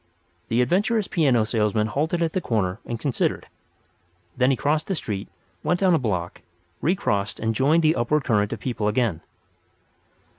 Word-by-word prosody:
The 120 Hz, +2 st, +2 dB
adventurous 205 Hz, -, +1 dB
piano 135 Hz, -9 st, +2 dB
salesman 105 Hz, -1 st, +1 dB
halted 155 Hz, +10 st, -1 dB
at 160 Hz, -, -1 dB
the 185 Hz, -, 0 dB
corner 100 Hz, -, -1 dB
and 120 Hz, -1 st, -4 dB
considered. 135 Hz, -2 st, -1 dB, 0.9 s
Then 125 Hz, +1 st, +3 dB
he 135 Hz, -, +2 dB
crossed 150 Hz, +2 st, 0 dB
the 195 Hz, -, -1 dB
street, 105 Hz, -, -4 dB, 0.3 s
walked 175 Hz, +1 st, 0 dB
down 185 Hz, -2 st, +4 dB
a 165 Hz, -, +3 dB
block, 90 Hz, -8 st, -3 dB, 0.4 s
recrossed 105 Hz, -, 0 dB
and 110 Hz, 0 st, 0 dB
joined 150 Hz, +8 st, +3 dB
the 155 Hz, +1 st, +4 dB
upward 140 Hz, +5 st, +1 dB
current 105 Hz, -4 st, +1 dB
of 115 Hz, -, -4 dB
people 110 Hz, -3 st, -2 dB
again. 105 Hz, -6 st, 0 dB
125 Hz, 160 wpm, -24 LUFS, 105-160 Hz, 0.9 s, down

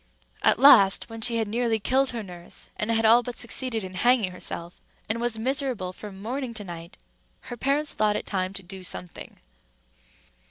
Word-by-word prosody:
At -, -, +3 dB
last, 225 Hz, -6 st, +6 dB
when 225 Hz, 0 st, -8 dB
she 235 Hz, +1 st, +2 dB
had 225 Hz, -2 st, -1 dB
nearly 230 Hz, +1 st, 0 dB
killed 260 Hz, +5 st, +1 dB
her 230 Hz, -2 st, -5 dB
nurse, 175 Hz, -3 st, -8 dB
and 210 Hz, -, -2 dB
had 225 Hz, 0 st, +2 dB
all 230 Hz, +2 st, +6 dB
but 245 Hz, 0 st, -7 dB
succeeded 240 Hz, -2 st, +1 dB
in 185 Hz, 0 st, -8 dB
hanging 230 Hz, 0 st, +2 dB
herself, 175 Hz, -1 st, -4 dB, 0.3 s
and 225 Hz, +2 st, -2 dB
was 240 Hz, -2 st, 0 dB
miserable 250 Hz, -6 st, -1 dB
from 195 Hz, 0 st, -10 dB
morning 245 Hz, +3 st, -4 dB
to 210 Hz, -, -5 dB
night, 170 Hz, -1 st, -9 dB, 0.5 s
her -, -, -4 dB
parents 280 Hz, +4 st, 0 dB
thought 210 Hz, -1 st, +1 dB
it -, -, -3 dB
time 185 Hz, -2 st, -2 dB
to 195 Hz, -, -5 dB
do 190 Hz, +1 st, -10 dB
something. 180 Hz, -1 st, -6 dB
225 Hz, 185 wpm, -25 LUFS, 190-245 Hz, 0.5 s, last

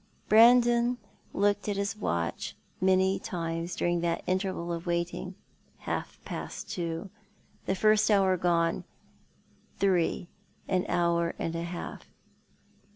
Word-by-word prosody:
Brandon 240 Hz, +2 st, +6 dB, 0.3 s
looked 205 Hz, 0 st, +1 dB
at 205 Hz, -, 0 dB
his 200 Hz, +2 st, -1 dB
watch 85 Hz, -, -2 dB, 0.3 s
many 190 Hz, +1 st, +3 dB
times 165 Hz, -2 st, -3 dB
during 175 Hz, -1 st, 0 dB
that 170 Hz, -1 st, -1 dB
interval 185 Hz, -2 st, -1 dB
of 170 Hz, +1 st, -5 dB
waiting. 175 Hz, +2 st, -2 dB, 0.4 s
Half -, -, -4 dB
past -, -, -6 dB
two 170 Hz, +2 st, -4 dB, 0.3 s
— -, -, -35 dB
the 190 Hz, -, +1 dB
first 215 Hz, +2 st, +4 dB
hour 195 Hz, -3 st, +4 dB
gone 170 Hz, -1 st, +1 dB, 0.5 s
— -, -, -35 dB
three, 185 Hz, -2 st, +1 dB, 0.4 s
an 185 Hz, -1 st, 0 dB
hour 170 Hz, -1 st, +1 dB
and 165 Hz, -, -3 dB
a 165 Hz, -, -2 dB
half. 170 Hz, +1 st, -6 dB
180 Hz, 125 wpm, -29 LUFS, 170-200 Hz, 0.5 s, Brandon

